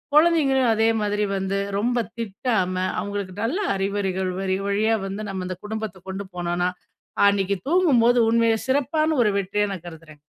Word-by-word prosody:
குழந்தைங்களையும் 285 -7 +4
அதே 225 +1 +3
மாதிரி 210 0 0
வந்து, 195 +1 -1 0.2
ரொம்ப 240 +4 +1 0.2
திட்டாம 205 -3 -1 0.2
அவுங்களுக்கு 200 -2 -4
நல்ல 270 - 0 0.2
அறிவுரைகள் 195 -1 -1
வழி 190 -1 0
வழியா 215 +3 +2
வந்து 195 +2 -5
நம்ம 190 -1 -4
அந்த 185 -1 -5
குடும்பத்த 215 -3 -5
கொண்டு 195 +1 -5
போனோன்னா, 175 +1 0 0.6
அன்னக்கி 200 -1 +1
தூங்கும்போது 250 -9 +4
உண்மையிலே 230 -1 +3
சிறப்பான 310 +4 +1
ஒரு 210 - +2
வெற்றியா 200 +2 0
நான் 175 -2 -8
கருதுகிறேன். 155 -2 -12
205 Hz, 145 wpm, -23 LUFS, 190-235 Hz, 0.6 s, குழந்தைங்களையும்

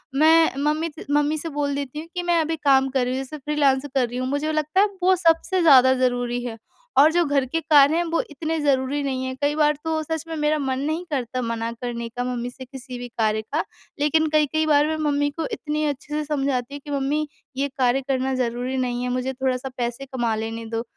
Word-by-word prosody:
मैं 320 +1 +5
मम्मी 305 +3 0
से - - -8
मम्मी 295 +1 +2
से 330 +2 -4
बोल 290 -1 -1
देती 280 +1 -4
हूँ 320 - -8
कि 355 - -2
मैं 345 -1 +2
अभी 320 +1 -1
काम 270 -3 +3
कर 260 -2 0
रही 250 - -1
हूँ, 265 - -2
जैसे 305 +3 -8
फ्रीलांस 285 -2 +1
कर 255 -3 +3
रही 245 +1 -6
हूँ 255 - -2
मुझे 285 +3 -1
लगता 310 +4 0
है - - +6
अब 400 -2 -16
वो 375 +1 +5
सबसे 345 +1 +2
ज़्यादा 260 -5 +7
ज़रूरी 245 -1 0
है 230 -2 -5 0.4
और 295 +3 +7
जो 345 +1 +3
घर 280 -2 +1
के 295 +6 -2
कार्य 295 -1 +5
हैं 345 - +2
वो 335 -1 0
इतने 315 +3 -3
ज़रूरी 280 -1 +1
नहीं 260 -2 -2
है। 260 - -3
कई 290 +1 +1
बार 300 -1 +3
तो 320 -1 -1
सच 320 0 -3
में 325 - -4
मेरा 300 0 +1
मन 265 -2 -1
नहीं 315 +5 -2
करता 255 -2 -2
मना 230 -1 -2
करने 235 0 -5
का 245 +2 -4
मम्मी 245 -1 -3
से 260 +1 -11
किसी 255 -1 -9
भी 245 - -6
कार्य 220 -2 0
का, 285 +9 -2 0.4
लेकिन 315 +2 +2
कई-कई 310 +1 +2
बार 295 -1 +4
मैं 315 0 -1
मम्मी 290 0 +1
को 325 - -1
इतनी 300 +4 -2
अच्छे 290 0 -4
से 305 0 0
समझाती 275 -3 -1
हूँ 285 - -6
कि 290 - -7
मम्मी 285 +2 0 0.3
ये 280 +1 +1
कार्य 255 0 +2
करना 265 -1 0
ज़रूरी 250 +1 -2
नहीं 245 -1 -1
है, 250 - -2
मुझे 255 +1 -2
थोड़ा-सा 260 0 -2
पैसे 240 +2 -3
कमा 240 -4 -1
लेने 225 +1 -4
दो। 225 +1 -3
280 Hz, 240 wpm, -23 LUFS, 250-305 Hz, 0.4 s, ज़्यादा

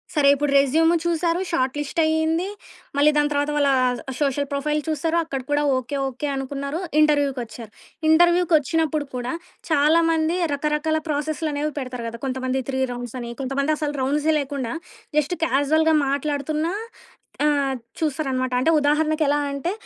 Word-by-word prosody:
సరే. 290 -2 +4
ఇప్పుడు 290 0 -1
రెస్యూమ్ 315 +4 +3
చూసారు. 340 0 +1
షార్ట్ 260 -4 0
లిస్ట్ 295 +4 -3
అయింది. 320 +3 +1 0.5
మళ్ళీ 300 +1 +5
దాని 295 0 +3
తరువాత 290 0 0
వాళ్ళ 285 -1 +3 0.5
సోషల్ 285 0 0
ప్రొఫైల్ 300 +2 0
చూసారు. 320 +2 0
అక్కడ 275 -4 -4
కూడా 290 0 +2
ఓకే, 255 +2 -4
ఓకే 265 +3 -5
అనుకున్నారు, 280 +3 -4 0.2
ఇంటర్వ్యూకి 290 -3 +2
వచ్చారు. 225 -1 -10 0.4
ఇంటర్వ్యూకి 345 +1 +4
వచ్చినప్పుడు 310 0 0
కూడా 250 0 -3 0.4
చాలా 310 +2 +4
మంది 325 +2 +1 0.2
రకరకాల 300 +2 0
ప్రాసెస్లనేవి 300 0 -1
పెడతారు 250 -3 -5
కదా! 230 0 -9
కొంతమంది 260 0 -1
3 265 -1 -1
రౌండ్స్ 245 0 -7
అని, 235 0 -6
కొంతమంది 275 +3 0
అసలు 295 -2 -2
రౌండ్సే 295 +4 +1
లేకుండా 275 -4 -3 0.4
జస్ట్ 300 +4 +1
కాజుయల్‌గా 315 +3 +2
మాట్లాడుతున్నా 300 +4 -1 0.7
ఆహ్, 285 -3 +2 0.2
చూస్తారన్నమాట. 265 -5 -1
అంటే 320 +6 +3
ఉదాహరణకెలా 300 0 +2
అంటే 280 +5 -2
290 Hz, 140 wpm, -23 LUFS, 270-315 Hz, 0.7 s, మళ్ళీ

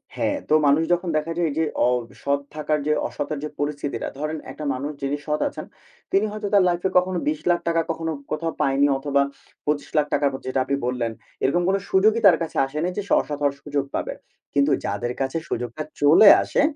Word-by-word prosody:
হ্যাঁ, 290 - 0
তো - - +3
মানুষ 145 +3 +4
যখন 175 0 -1
দেখা 155 +2 -2
যায় 175 -1 +2
এই - - -4
যে 160 - +2 0.5
অসৎ 140 +6 -1 0.2
থাকার 155 0 0
যে, - - +3 0.2
অসতার 145 0 -4
যে 150 - -3
পরিস্থিতিটা, 145 -1 -3
ধরেন 155 +1 -2
একটা 150 - -7
মানুষ 140 +3 -4
যিনি 140 +1 -1
সৎ 150 0 0
আছেন, - - -8 0.5
তিনি 195 +2 +3
হয়তো 210 0 -4
তার 200 - +6
লাইফে 175 +2 0
কখনো 180 0 +2
৳২০,০০,০০০ 170 +2 +1
কখনো 165 0 -3 0.2
কোথাও 165 +2 -1
পায়নি 140 +1 +3
অথবা 140 0 +1 0.4
৳২৫,০০,০০০ 150 0 0 0.2
যেটা 130 +1 -1
আপনি 140 - 0
বললেন, 125 -2 -1 0.3
এরকম 175 +6 +2
কোন 195 - +3
সুযোগই 215 +4 +3
তার 185 - +6
কাছে 165 - -6
আসে 135 +3 -8
নাই 180 - 0
যে - - 0
স - - -15
সে - - +1
অসৎ 145 -1 -6
হওয়ার 140 -1 +1
সুযোগ 145 -1 -1
পাবে। - - -2 0.4
কিন্তু 140 +1 +3
যাদের 120 +5 -2
কাছে 135 +4 -1
সুযোগটা 120 +5 -3 0.2
চলে 155 +8 +8
আসে, - - +1
150 Hz, 195 wpm, -23 LUFS, 140-170 Hz, 0.5 s, চলে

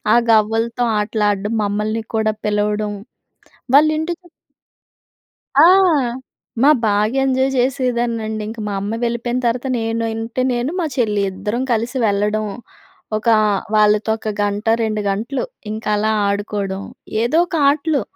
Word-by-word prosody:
ఆ - - +6 0.2
గవ్వలతో 225 +2 +2 0.2
ఆటలాడం 210 -1 0
మమ్మల్ని 210 +2 -1
కూడా 220 -1 +1
పిలవడం. 210 0 0 0.8
వాళ్ళ 300 +2 +7
ఇంటి 325 +2 -2 1.5
ఆ! - - +8 1.0
మా 280 - +6 0.2
బాగా 210 +3 +1
ఎంజాయ్ 265 0 +2
జేసిదాన్నండి. 240 -4 -1
ఇంక 225 +1 -8
మా 205 - -3
అమ్మ 205 +3 -3
వెళ్ళిపోయిన 235 +1 -1
తర్వాత 240 +3 -1
నేను 225 0 -2
ఉంటే 225 +3 -3
నేను, 245 +4 -1
మా 330 - 0
చెల్లి 210 -4 +1
ఇద్దరం 210 +6 -3
కలిసి 235 +3 -1
వెళ్ళడం. 210 +1 0 0.7
ఒక 215 +2 -3 0.5
వాళ్ళతో 210 +1 +3
ఒక 220 - -6
గంట, 205 +1 -2 0.2
రెండు 215 -1 -1
గంటలు 230 +7 -2 0.3
ఇంకా 215 0 -3
అలా 215 +1 +1 0.2
ఆడుకోవడం. 200 -1 -2 0.4
ఏదో 250 +7 +2
ఒక 350 - -8 0.2
ఆటలు. 295 -2 0
220 Hz, 125 wpm, -19 LUFS, 210-240 Hz, 1.5 s, ఆ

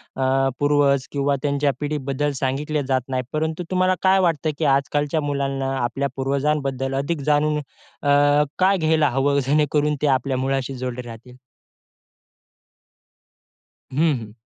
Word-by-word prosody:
अ, 135 0 +1
पूर्वज 145 -2 +2
किंवा 140 0 0
त्यांच्या 140 0 +1
पिढीबद्दल 145 -1 -2
सांगितले 145 +3 -1
जात 130 -1 +1
नाही. 130 -1 -1
परंतु 160 +2 -2
तुम्हाला 185 0 +2
काय 190 0 +4
वाटतं 165 -4 +1
की 160 - -1
आजकालच्या 145 +3 -1
मुलांना 135 -2 -2
आपल्या 135 +3 -1
पूर्वजांबद्दल 135 -1 -1
अधिक 155 +1 -3
जाणून 150 +1 +2
अ, 145 0 -7 0.5
का 190 +2 +4
घ्यायला 155 -4 +2
हवं, 140 +2 +1
जेणेकरून 150 +1 +2
ते 150 - +2
आपल्या 130 0 -2
मुळाशी 135 0 -1
जोडले 125 0 -4
राहतील? 120 +2 -11 2.6
हं, 150 0 +2
हं. 105 -2 -10
140 Hz, 130 wpm, -22 LUFS, 135-150 Hz, 2.6 s, काय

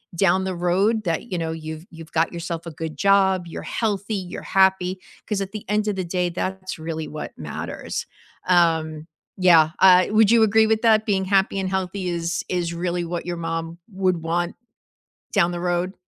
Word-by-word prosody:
down 190 +1 +3
the 190 -1 -2
road 195 +6 +1
that, 170 +7 -2
you 180 - -1
know, 160 -1 -2
you've 160 +1 -7
you've 165 -1 -12
got 165 +1 +1
yourself 170 -1 -5
a 165 - -6
good 160 0 -6
job, 190 -2 +3
you're - - -7
healthy, 210 -1 -2
you're 185 -2 -5
happy. 190 -1 +2 0.3
'Cause 205 -2 -1
at 195 0 -4
the 215 - -6
end 210 0 +1
of 205 - 0
the 185 - -2
day, 180 0 -1
that's 185 +1 -4
really 160 -1 -4
what 150 0 -6
matters. 75 -2 -5 0.4
Um, 160 -3 +2 0.3
yeah, 165 -4 +5
uh, 185 -1 +7
would 215 -1 +5
you 230 -1 +6
agree 220 +1 +4
with 220 +1 +1
that, 220 -1 +4
being 190 -2 +1
happy 195 0 +2
and 190 - -1
healthy 190 0 -2
is 170 0 -2
is 175 -2 -1
really 175 0 -2
what 175 0 -4
your 175 -1 -3
mom 165 0 -4
would 185 -2 +1
want 170 +1 -1 0.8
down 175 -4 +3
the 175 - -4
road? 180 +1 -1
180 Hz, 190 wpm, -23 LUFS, 170-195 Hz, 0.8 s, uh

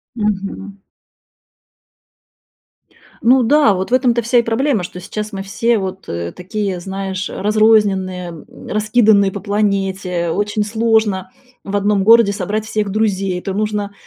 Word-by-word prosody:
Мгм. 200 -2 -3 2.4
Ну 255 +2 +4
да, 260 -3 +4
вот 190 +4 -3
в - - 0
этом-то 245 -2 +3
вся 235 +2 +1
и - - +4
проблема, 230 -2 0
что 180 +1 -7
сейчас 210 +3 -6
мы 195 - -4
все 230 +4 0
вот, 190 -1 -5
э, 85 0 -4
такие, 195 0 -4
знаешь, 190 +1 -4
разрозненные, 200 -4 +2
м, 165 -3 -12
раскиданные 215 -2 +3
по 200 - -6
планете. 195 -4 -1
Очень 205 +4 -1
сложно 220 -3 0 0.4
в 200 - -4
одном 200 0 +1
городе 230 -2 +6
собрать 205 +2 -3
всех 215 -2 -2
друзей. 195 -3 0
Это 190 +2 -5
нужно 205 0 -2
205 Hz, 135 wpm, -17 LUFS, 190-220 Hz, 2.4 s, городе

